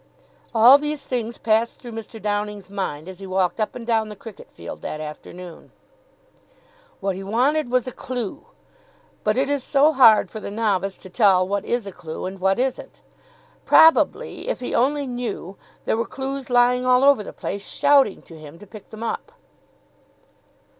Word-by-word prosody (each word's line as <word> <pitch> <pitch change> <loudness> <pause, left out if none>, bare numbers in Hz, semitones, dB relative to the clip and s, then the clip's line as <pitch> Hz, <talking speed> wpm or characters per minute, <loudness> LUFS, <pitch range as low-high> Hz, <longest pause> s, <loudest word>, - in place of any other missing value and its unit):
All 245 +5 +8
these 295 -1 -4
things 235 -2 -3
passed 225 +1 0
through 240 - -10
Mr. 225 0 -8
Downing's 205 -2 -3
mind 180 -6 -4
as 190 -1 -9
he 195 - -8
walked 185 +2 0
up 215 - -2
and 235 - -7
down 225 -2 0
the 210 - -8
cricket 210 +1 -12
field - - -9
that 155 - -5
afternoon. 165 +3 -10 1.3
What 195 -1 -1
he 190 - -7
wanted 250 +8 +1
was 250 -1 +1
a 255 - -5
clue. 245 -5 -6 0.8
But 215 +2 +1
it 270 +1 +2
is 285 -2 -1
so 290 +3 +3
hard 235 -6 +6
for 220 - -6
the - - -6
novice 200 -3 -1
to 185 - -13
tell 185 -3 +4
what 200 +1 -1
is 240 -3 -1
a 200 - -6
clue 165 -3 -7
and 190 +1 -6
what 190 +1 +2
isn't. 260 +1 -3 0.6
Probably, 325 +8 +4
if - - -2
he 250 - -5
only 285 +4 +1
knew, 245 -7 -5 0.3
there - - 0
were 230 - -2
clues 270 0 -5
lying 245 0 +3
all 255 +1 +4
over 280 -5 +5
the - - -8
place, 200 0 -5
shouting 280 -7 +3
to 165 -2 -13
him 155 +1 -12
to 205 - -13
pick 210 0 -13
them 220 +1 -9
up. 230 - -4
225 Hz, 180 wpm, -22 LUFS, 195-255 Hz, 1.3 s, All